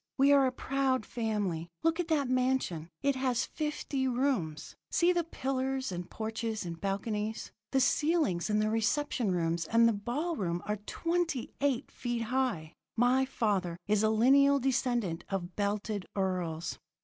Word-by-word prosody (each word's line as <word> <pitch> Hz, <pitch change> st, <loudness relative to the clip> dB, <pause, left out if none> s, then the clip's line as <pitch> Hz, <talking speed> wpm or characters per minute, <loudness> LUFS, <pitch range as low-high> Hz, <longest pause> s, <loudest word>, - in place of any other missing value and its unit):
We 275 Hz, +1 st, +5 dB
are 275 Hz, -2 st, +6 dB
a -, -, 0 dB
proud 260 Hz, -2 st, 0 dB
family. 205 Hz, -8 st, -2 dB
Look 330 Hz, +1 st, +2 dB
at 350 Hz, -, 0 dB
that 300 Hz, -5 st, +1 dB
mansion. 255 Hz, -11 st, 0 dB
It 280 Hz, -1 st, +2 dB
has 255 Hz, -2 st, +1 dB
fifty 300 Hz, -3 st, -2 dB
rooms. 245 Hz, -, -1 dB
See 355 Hz, +1 st, +3 dB
the 345 Hz, -1 st, +1 dB
pillars 265 Hz, -, -2 dB
and 175 Hz, 0 st, -5 dB
porches 220 Hz, -1 st, -3 dB
and 170 Hz, -1 st, -6 dB
balconies. 210 Hz, +2 st, -2 dB, 0.2 s
The 270 Hz, -, +2 dB
ceilings 295 Hz, -, +2 dB
in 210 Hz, -, +2 dB
the 215 Hz, 0 st, +1 dB
reception 225 Hz, +1 st, 0 dB
rooms 170 Hz, -1 st, 0 dB
and 230 Hz, +5 st, +4 dB
the 230 Hz, -, +3 dB
ball 265 Hz, +12 st, -2 dB
room 175 Hz, -, -2 dB
are 210 Hz, 0 st, -1 dB
twenty 335 Hz, -6 st, -1 dB
eight 275 Hz, -2 st, 0 dB
feet 240 Hz, -1 st, -3 dB
high. 210 Hz, -12 st, 0 dB, 0.2 s
My 250 Hz, +3 st, +4 dB
father 200 Hz, -9 st, -1 dB
is 210 Hz, 0 st, +2 dB
a 215 Hz, -, +3 dB
lineal 275 Hz, +6 st, +5 dB
descendant 240 Hz, -9 st, 0 dB
of 180 Hz, -3 st, -3 dB
belted 205 Hz, -1 st, -2 dB
earls.' 180 Hz, -4 st, -2 dB
230 Hz, 155 wpm, -31 LUFS, 195-270 Hz, 0.2 s, are